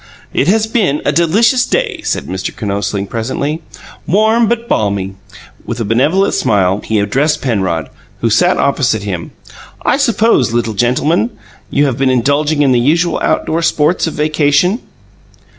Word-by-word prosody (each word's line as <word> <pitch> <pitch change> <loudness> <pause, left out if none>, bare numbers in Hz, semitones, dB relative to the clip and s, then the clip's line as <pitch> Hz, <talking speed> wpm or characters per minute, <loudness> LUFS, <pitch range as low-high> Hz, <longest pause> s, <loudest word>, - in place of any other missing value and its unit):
"It 135 - +1
has 215 +3 +3
been 210 - 0
a - - +2
delicious 225 +10 +3
day," 420 - -1
said - - -2
Mr. 95 +1 -4
Kinosling, 100 -1 -2
presently; 135 +8 -3 0.5
"warm 220 +5 +3
but 235 +1 -1
balmy." 100 - -1 0.5
With 120 0 -5
a 115 - -2
benevolent 150 - +2
smile 95 -1 +1
he 110 - -1
addressed 135 +10 0
Penrod, 95 - -1 0.3
who 115 - +1
sat 180 - +3
opposite 130 -6 +1
him. 90 -5 -4 0.6
"I - - +3
suppose, 225 - +2
little 115 -2 0
gentleman, 135 - +1 0.4
you 145 - +2
have 130 -2 -2
been 135 -1 +2
indulging 145 +4 +1
in 135 - +3
the 125 - +3
usual 165 +7 +1
outdoor 165 +1 0
sports 160 +1 +1
of 160 - -5
vacation?" 150 - +1
145 Hz, 150 wpm, -14 LUFS, 115-180 Hz, 0.6 s, has